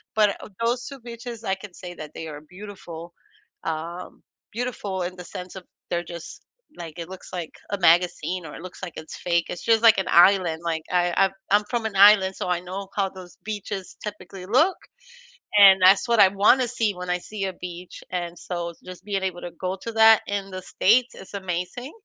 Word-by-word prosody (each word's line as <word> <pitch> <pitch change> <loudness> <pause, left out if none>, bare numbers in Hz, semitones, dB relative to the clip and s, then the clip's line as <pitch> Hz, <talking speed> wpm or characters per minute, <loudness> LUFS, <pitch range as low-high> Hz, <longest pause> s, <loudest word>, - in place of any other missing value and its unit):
but, 210 -2 +3
uh, - - -8 0.2
those 240 +1 0
2 275 -2 -8
beaches, 235 -1 -8
I 190 -3 0
can 190 -1 -11
say 175 0 -9
that 155 -3 -9
they 160 - -7
are 145 -1 -8
beautiful- 175 -1 -10 0.5
um, 165 +3 -5 0.3
beautiful 210 -5 -3
in 180 +1 -4
the 180 - -8
sense 180 +2 -8
of, 190 - -8 0.3
they're 175 0 -1
just, 170 -1 -9 0.3
like, 165 -2 -8
it 170 0 -6
looks 190 -1 -10
like 175 -3 -5 0.2
a 200 - 0
magazine, 175 +1 +2
or - - -9
it - - -9
looks 185 - -10
like 175 - -5
it's 155 0 -8
fake. 170 -1 +1
It's 175 - -6
just 225 0 +3
like 225 -1 +7
an 190 - -2
island, 175 -2 +5
like, 160 -2 -1
I 175 -1 +2
I 195 0 +5 0.2
I'm 205 +1 +5
from 240 -2 -1
an 215 -2 -3
island, 195 -1 +7
so - - -4
I 180 -1 +1
know 190 +2 -6
how 195 -2 +1
those 185 -2 -13
beaches 205 -2 -5
typically 195 -3 -8
look, 310 - +3 0.8
and 195 -2 +9
that's 195 +5 +6
what 235 -1 +2
I 190 - +8
wanna 210 +6 +4
see 225 -3 0
when 180 0 -6
I 180 - +2
see 205 +2 -6
a 190 - -3
beach, 180 0 -9
and 175 -1 -3
so, 170 -1 -4
just 185 0 -10
being 200 -2 -1
able 185 -2 -3
to 175 - -6
go 185 +3 -4
to 230 - -4
that 220 0 +7
in 200 -1 -3
the 185 0 -6
States 235 +7 +2
is 190 - -12
amazing, 190 - -4
190 Hz, 210 wpm, -24 LUFS, 175-210 Hz, 0.8 s, and